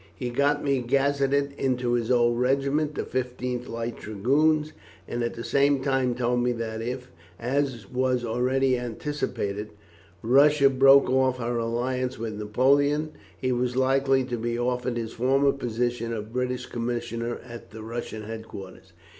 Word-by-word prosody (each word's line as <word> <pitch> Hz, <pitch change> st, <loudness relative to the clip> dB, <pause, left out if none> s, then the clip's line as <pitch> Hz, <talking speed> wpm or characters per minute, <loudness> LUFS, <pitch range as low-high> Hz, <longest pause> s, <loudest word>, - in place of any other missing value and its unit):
He 125 Hz, -2 st, -4 dB
got 145 Hz, +3 st, +1 dB
me 140 Hz, -2 st, +1 dB
gazetted 140 Hz, +2 st, +1 dB
into 125 Hz, -2 st, 0 dB
his 120 Hz, -2 st, 0 dB
old 120 Hz, -1 st, +3 dB
regiment, 140 Hz, +4 st, +1 dB
the -, -, -2 dB
15th 125 Hz, -1 st, -3 dB
Light 115 Hz, 0 st, -4 dB
Dragoons, 150 Hz, +9 st, +1 dB, 0.3 s
and 120 Hz, -, -3 dB
at 120 Hz, -, -2 dB
the 115 Hz, -, -6 dB
same 140 Hz, 0 st, +2 dB
time 130 Hz, -3 st, +1 dB
told 120 Hz, 0 st, +1 dB
me 125 Hz, 0 st, +1 dB
that 110 Hz, -1 st, -4 dB
if, 125 Hz, +2 st, -5 dB, 0.3 s
as 125 Hz, -3 st, -1 dB
was 125 Hz, 0 st, 0 dB
already 125 Hz, +2 st, +1 dB
anticipated, 110 Hz, -4 st, -3 dB, 0.5 s
Russia 140 Hz, +3 st, +5 dB
broke 135 Hz, +1 st, +6 dB
off 130 Hz, 0 st, +2 dB
her 120 Hz, -1 st, -2 dB
alliance 125 Hz, +3 st, -1 dB
with 110 Hz, -1 st, -4 dB
Napoleon, 140 Hz, +8 st, +2 dB, 0.3 s
he 130 Hz, -1 st, -1 dB
was 125 Hz, 0 st, 0 dB
likely 135 Hz, 0 st, +3 dB
to 125 Hz, -1 st, -3 dB
be 120 Hz, +1 st, -2 dB
offered 125 Hz, 0 st, -1 dB
his 115 Hz, -1 st, -4 dB
former 135 Hz, +3 st, +3 dB
position 120 Hz, -2 st, -2 dB
of 110 Hz, 0 st, -5 dB
British 125 Hz, 0 st, -2 dB
commissioner 120 Hz, 0 st, -3 dB
at 120 Hz, -1 st, -10 dB
the 110 Hz, 0 st, -9 dB
Russian 115 Hz, -1 st, -5 dB
headquarters. 100 Hz, -4 st, -9 dB
125 Hz, 150 wpm, -26 LUFS, 120-135 Hz, 0.5 s, broke